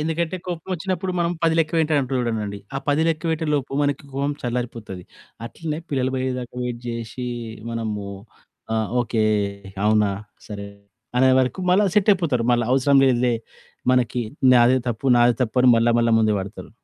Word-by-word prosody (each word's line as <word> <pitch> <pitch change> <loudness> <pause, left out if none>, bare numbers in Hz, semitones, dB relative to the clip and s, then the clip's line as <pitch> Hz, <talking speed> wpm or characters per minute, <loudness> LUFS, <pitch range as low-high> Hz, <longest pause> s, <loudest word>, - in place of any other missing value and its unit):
ఎందుకంటే, 165 +3 -1
కోపమొచ్చినప్పుడు 185 +1 -3
మనం 170 0 +1
10 165 -1 +3
లెక్కపెట్టె 160 -1 +1
అంటూ 130 0 -3
ఉంటానండి. 105 -4 -3 0.2
ఆ - - 0
10 145 +2 +3
లెక్క 160 -1 -1
పెట్టే 160 0 -1
లోపు 140 -1 -2
మనకి 145 -1 0
కోపం 140 +2 -1
చల్లారిపోతది. 115 -6 -4 0.4
అట్లనే 155 +3 -5
పిల్లలు 130 -2 0
పోయేదాకా 130 -2 -3
వెయిట్ 120 -1 -4
జేషి, 115 +2 -5 0.4
మనము 110 -3 -3 0.7
ఆహ్, 110 -2 0
ఓకే, 115 -2 0 0.6
అవునా, 105 -1 +3 0.4
సరే, 100 -1 -7 0.5
అనే 130 +1 +5
వరకు 130 +8 0
మళ్ళా 195 +3 +4
సెట్టయిపోతారు. 175 - +2
మళ్ళా 120 -1 +2
అవసరం 135 +1 +3
లేదులే 125 -2 +2 0.6
మనకి 125 -1 +1 0.3
నాదే 125 +1 +5
తప్పు, 120 +3 -3
నాదె 120 0 +5
తప్పు 115 0 -3
అని 125 - +6
మళ్ళా, 115 +1 +3
మళ్ళా 115 0 +2
ముందు 110 -1 +2
పడతరు. 95 +1 -8
125 Hz, 150 wpm, -22 LUFS, 115-155 Hz, 0.7 s, అని